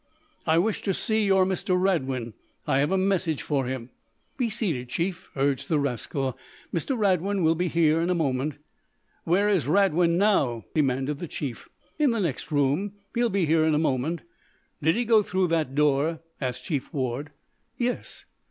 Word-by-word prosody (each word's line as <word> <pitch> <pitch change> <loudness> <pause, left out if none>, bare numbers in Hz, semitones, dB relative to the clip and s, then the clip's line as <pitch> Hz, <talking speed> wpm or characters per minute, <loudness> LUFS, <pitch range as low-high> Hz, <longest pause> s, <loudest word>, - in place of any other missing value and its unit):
"I 160 0 +4
wish 210 +5 +1
to 195 -3 -1
see 220 -2 +1
your 190 -1 +4
Mr. 185 -1 0
Radwin. 135 - 0 0.3
I 135 - +2
have 145 +5 +1
a 190 - +3
message 185 -5 0
for 135 -4 0
him." 130 -1 -5 0.4
"Be 245 -3 0
seated, 170 - -2
Chief," 180 +5 -3
urged 135 -1 0
the 155 - +3
rascal. 135 -1 -2 0.4
"Mr. 245 - -1
Radwin 195 -2 +1
will 160 0 +4
be 175 +2 -1
here 165 -1 +3
in 170 - 0
a 180 - +2
moment." 140 -2 0 0.7
"Where 185 +5 +3
is 195 -9 +2
Radwin 170 -1 +3
now?" 145 - +2
demanded 135 -1 0
the 175 - -5
chief. 135 -6 -6 0.3
"In 295 -2 +4
the 230 -2 0
next 165 -8 -2
room. 145 +8 +1 0.2
He'll 240 0 +2
be 195 -3 +1
here 160 +1 +3
in 160 -1 +3
a - - +3
moment." 155 +2 0 0.6
"Did 160 +4 +3
he 240 +1 0
go 225 -1 +5
through 185 -2 0
that 155 -5 0
door?" 150 +2 +2 0.2
asked 125 -1 -3
Chief 145 -6 -3
Ward. 135 +1 -2 0.5
"Yes." 245 0 -3
165 Hz, 175 wpm, -26 LUFS, 140-190 Hz, 0.7 s, go